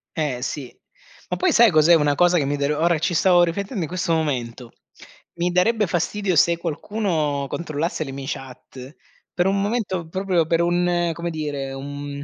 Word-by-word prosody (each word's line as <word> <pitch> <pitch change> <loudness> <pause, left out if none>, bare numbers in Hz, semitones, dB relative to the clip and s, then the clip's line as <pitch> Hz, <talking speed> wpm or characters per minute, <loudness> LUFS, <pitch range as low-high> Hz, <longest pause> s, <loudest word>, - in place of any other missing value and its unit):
Eh, 140 -6 -2
sì, 130 -1 -5 0.6
ma - - -2
poi 370 -1 +2
sai 235 - +6
cos'è 155 +2 +6
una 150 -2 +2
cosa 175 +3 +3
che 145 - +1
mi 145 - -1
dare 145 +1 0
ora 165 +1 +2
ci 170 +2 -1
stavo 175 +1 +4
riflettendo 190 +4 -1
in - - -3
questo 180 0 -1
momento. 125 -6 -2 0.7
Mi 175 +1 +1
darebbe 210 +3 +2
fastidio 185 +2 -1
se 170 +2 +4
qualcuno 160 -5 -2
controllasse 160 0 -3
le 135 - -7
mie 135 0 -7
chat 130 0 -8 0.4
per 175 +1 +1
un 195 0 +1
momento, 200 -5 -2
proprio 185 -3 0
per 165 +1 +1
un 175 0 +1
come 170 0 -4
dire, 145 -3 -4
un 140 +1 -6
165 Hz, 175 wpm, -22 LUFS, 145-180 Hz, 0.7 s, sai